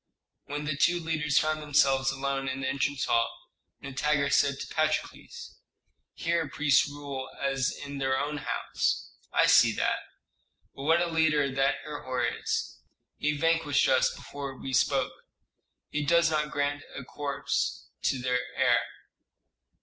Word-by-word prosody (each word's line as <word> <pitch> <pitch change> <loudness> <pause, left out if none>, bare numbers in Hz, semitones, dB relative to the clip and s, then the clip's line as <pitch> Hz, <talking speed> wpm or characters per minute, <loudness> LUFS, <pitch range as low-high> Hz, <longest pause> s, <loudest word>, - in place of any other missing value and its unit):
When 145 +1 -4
the 150 -1 -1
two 175 +4 +3
leaders 155 -3 0
found 155 0 +2
themselves 135 -2 +3
alone 135 0 -2
in 130 0 -3
the 130 - -1
entrance 140 0 0
hall, 115 0 -1 0.3
Nitager 140 +1 0
said 140 -1 +3
to - - -4
Patrokles, 470 0 -2 0.6
"Here 170 -3 0
priests 145 +1 +3
rule 140 -2 -6
as 135 -1 0
in 140 -1 -7
their 130 -1 +1
own 150 +1 -2
house. - - -2 0.2
I - - +4
see - - +6
that. - - +1 0.7
But 135 - -8
what 165 +2 +4
a - - +1
leader 155 -4 +2
that 135 0 +2
Herhor 130 -4 -2
is! - - -3 0.4
He 150 0 0
vanquished 165 -2 +2
us 130 -1 +4
before 140 -2 -7
we 135 - -6
spoke; - - +2 0.8
he 150 0 -1
does 170 +2 +4
not 150 -1 0
grant 145 0 -1
a 135 - -6
corps 140 0 -2 0.2
to 130 - 0
the 125 0 +1 0.2
heir." 125 -3 +4
145 Hz, 145 wpm, -28 LUFS, 135-150 Hz, 0.8 s, see